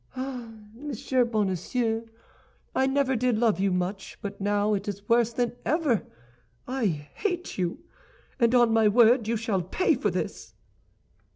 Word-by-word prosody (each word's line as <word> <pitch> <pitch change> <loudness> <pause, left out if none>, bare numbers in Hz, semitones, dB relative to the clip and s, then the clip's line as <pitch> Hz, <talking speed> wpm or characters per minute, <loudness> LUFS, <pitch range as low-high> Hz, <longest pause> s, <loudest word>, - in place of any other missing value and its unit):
Ah, 255 -3 -5 0.2
Monsieur 260 0 -1
Bonacieux, 225 +2 -1 0.7
I 265 - +2
never 270 -1 +1
did 245 -1 +1
love 225 -3 +2
you 195 0 +2
much, 180 +2 -3
but 200 0 -6
now 205 +1 +1
it 200 - -2
is 200 0 -5
worse 235 0 +3
than 240 0 0
ever. 300 - +1 0.6
I 255 -3 0 0.3
hate 360 - -3
you, 175 -2 -2 0.6
and 235 0 +4
on 240 -2 +5
my 225 -1 +5
word 230 +1 +5
you 230 0 +1
shall 215 -4 -1
pay 185 - +1
for - - 0
this!" - - -5
230 Hz, 150 wpm, -27 LUFS, 205-255 Hz, 0.7 s, on